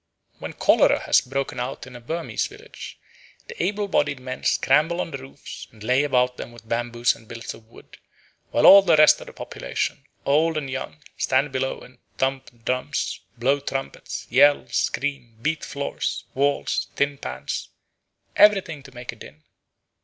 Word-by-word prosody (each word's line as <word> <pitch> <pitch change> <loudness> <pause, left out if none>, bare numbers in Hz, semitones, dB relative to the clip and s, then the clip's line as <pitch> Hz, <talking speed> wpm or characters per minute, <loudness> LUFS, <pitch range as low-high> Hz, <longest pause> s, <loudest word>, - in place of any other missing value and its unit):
When - - -6
cholera - - +4
has - - +4
broken 135 +1 -3
out 125 +2 -4
in 130 -1 -12
a 120 - -10
Burmese 165 +7 -2
village - - -11 0.5
the 475 0 -7
able 205 +1 -1
bodied 145 -7 +1
men 130 0 -7
scramble 150 +6 +3
on 165 - -3
the 135 - -5
roofs 135 +1 -10
and 110 -1 -14
lay 125 +5 +3
about 125 -3 +1
them - - -7
with 115 -1 -15
bamboos 120 +1 +1
and 115 -1 -18
billets 115 -2 -7
of 110 - -16
wood, 115 - -16 0.5
while - - +2
all 200 +1 +11
the 175 -4 +4
rest 155 0 +6
of - - -10
the - - -10
population, - - -4 0.2
old 155 +3 +3
and 140 -3 -3
young, 150 +3 -6
stand 135 +2 +1
below 130 0 -2
and 125 -1 -16 0.2
thump 130 -3 -3
drums, 125 0 -1 0.2
blow 135 +4 +2
trumpets, 135 -1 -5
yell, 145 0 +5
scream, 135 -5 -2
beat 155 +4 -1
floors, 140 0 -3
walls, 140 +2 0
tin 140 0 0
pans, 65 +1 -5 0.7
everything 190 -8 +4
to 135 -2 -15
make 125 0 -6
a - - -13
din. 75 -7 -14
135 Hz, 170 wpm, -24 LUFS, 120-145 Hz, 0.7 s, all